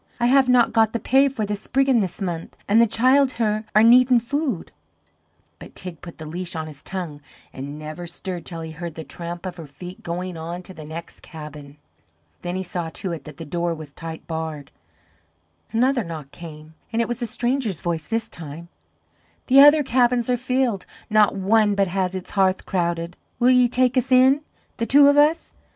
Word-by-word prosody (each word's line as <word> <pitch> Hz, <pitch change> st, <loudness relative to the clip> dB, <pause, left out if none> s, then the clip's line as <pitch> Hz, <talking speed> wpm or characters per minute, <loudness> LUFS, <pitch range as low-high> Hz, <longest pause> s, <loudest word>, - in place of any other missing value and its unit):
I 240 Hz, -, +2 dB
have 260 Hz, +1 st, +4 dB
not 250 Hz, -2 st, +4 dB
got 225 Hz, -2 st, +3 dB
the 235 Hz, -, -1 dB
pay 270 Hz, +5 st, +4 dB
for 255 Hz, -6 st, -2 dB
the 205 Hz, 0 st, -2 dB
spriggin' 265 Hz, +4 st, +1 dB
this 195 Hz, 0 st, -3 dB
month, 170 Hz, -3 st, -5 dB
an' 210 Hz, +3 st, +4 dB
the 235 Hz, -, +6 dB
childher 235 Hz, -3 st, +2 dB
are 215 Hz, -, +7 dB
needin' 245 Hz, +1 st, +6 dB
food." 260 Hz, -, -3 dB, 0.9 s
But -, -, -12 dB
Teig 180 Hz, -4 st, -7 dB
put 170 Hz, -, -10 dB
the 155 Hz, -, -8 dB
leash 175 Hz, +3 st, -4 dB
on 160 Hz, -1 st, -3 dB
his 150 Hz, -2 st, -11 dB
tongue, 170 Hz, -6 st, -6 dB, 0.3 s
and 140 Hz, +2 st, -7 dB
never 155 Hz, +3 st, -7 dB
stirred 175 Hz, 0 st, -6 dB
till 165 Hz, -1 st, -7 dB
he 160 Hz, 0 st, -6 dB
heard 165 Hz, 0 st, -7 dB
the 160 Hz, -, -6 dB
tramp 170 Hz, +2 st, -7 dB
of 180 Hz, -1 st, -5 dB
her 165 Hz, -3 st, -9 dB
feet 175 Hz, +6 st, -10 dB
going 180 Hz, +1 st, -4 dB
on 170 Hz, +3 st, -6 dB
to 190 Hz, -, -9 dB
the 155 Hz, -3 st, -10 dB
next 160 Hz, +2 st, -8 dB
cabin. 150 Hz, -2 st, -11 dB, 0.6 s
Then 175 Hz, +1 st, -4 dB
he 190 Hz, -, -2 dB
saw 175 Hz, -2 st, -4 dB
to 185 Hz, +3 st, -5 dB
it 165 Hz, -, -6 dB
that 155 Hz, -2 st, -11 dB
the 165 Hz, -, -7 dB
door 170 Hz, +2 st, -2 dB
was 155 Hz, -3 st, -10 dB
tight 165 Hz, -1 st, -8 dB
barred. 160 Hz, -3 st, -5 dB, 1.0 s
Another 245 Hz, +2 st, +2 dB
knock 155 Hz, -5 st, -8 dB
came, 155 Hz, -2 st, -11 dB, 0.2 s
and 230 Hz, -, -1 dB
it 235 Hz, -, +1 dB
was 240 Hz, +1 st, -4 dB
a 240 Hz, -, -1 dB
stranger's 240 Hz, -, -1 dB
voice 165 Hz, -3 st, -3 dB
this 225 Hz, 0 st, -1 dB
time: 165 Hz, -2 st, -9 dB, 0.8 s
"The 270 Hz, +1 st, +6 dB
other 295 Hz, +2 st, +8 dB
cabins 245 Hz, -1 st, +2 dB
are -, -, +3 dB
filled; 250 Hz, -4 st, -1 dB, 0.2 s
not 210 Hz, -2 st, +4 dB
one 205 Hz, +2 st, +3 dB
but 200 Hz, 0 st, +3 dB
has 185 Hz, 0 st, -1 dB
its 185 Hz, -, -6 dB
hearth 190 Hz, -1 st, +1 dB
crowded; 170 Hz, -1 st, -2 dB, 0.2 s
will 250 Hz, +1 st, +4 dB
ye 250 Hz, -1 st, +5 dB
take 250 Hz, +1 st, +2 dB
us 255 Hz, +1 st, 0 dB
in 260 Hz, +3 st, +5 dB, 0.4 s
the 230 Hz, -, -2 dB
two 285 Hz, +1 st, +7 dB
of 285 Hz, -, +4 dB
us? 300 Hz, +3 st, +3 dB
190 Hz, 200 wpm, -23 LUFS, 165-245 Hz, 1.0 s, other